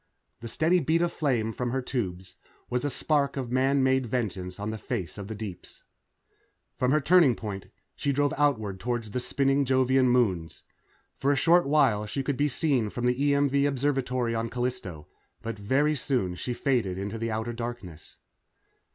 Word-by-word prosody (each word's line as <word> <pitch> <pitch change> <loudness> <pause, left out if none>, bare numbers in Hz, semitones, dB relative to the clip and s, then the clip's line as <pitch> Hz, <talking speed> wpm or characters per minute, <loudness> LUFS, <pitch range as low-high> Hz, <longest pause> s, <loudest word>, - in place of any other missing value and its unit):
The 115 - -7
steady 165 +9 +2
beat 165 +1 +1
of 175 - -1
flame 120 -7 0
from 125 +1 -2
her 130 +2 -1
tubes 95 -8 -4 0.4
was 125 0 0
a - - +1
tiny 130 - -5
spark 140 -3 +1
of 125 -3 -4
man 135 +2 +2
made 130 -1 +2
vengeance 95 -6 -3
on 105 +2 -3
the 110 - -6
face 95 -11 -4
of 100 -2 -7
the 110 - -5
deeps. 100 -4 -9 0.9
From 125 - 0
her 155 - +4
turnover 155 -4 +5
point, 100 -3 -6 0.3
she 140 - -1
drove 145 +1 +1
outward 110 -10 0
toward 120 +2 -2
the 110 +3 -4
spinning 135 +2 +1
Jovian 130 0 +3
moons. 95 -10 0 0.6
For 140 - +2
a - - +3
short 170 +4 +4
while 135 -8 +3
she 135 +6 -3
could 140 0 -1
be 145 +2 +1
seen 135 -9 +1
from 120 +3 -4
the 135 +4 +2
EMV 140 0 +2
Observatory 130 -3 0
on 115 0 -2
Callisto, 120 -11 -4 0.4
but 115 -2 -5
very 135 +9 +2
soon 125 -10 -1
she 120 +7 -4
faded 120 -10 0
into 100 +3 -4
the 115 +1 -2
outer 110 +2 -3
darkness. 115 -9 -7
125 Hz, 180 wpm, -27 LUFS, 110-140 Hz, 0.9 s, turnover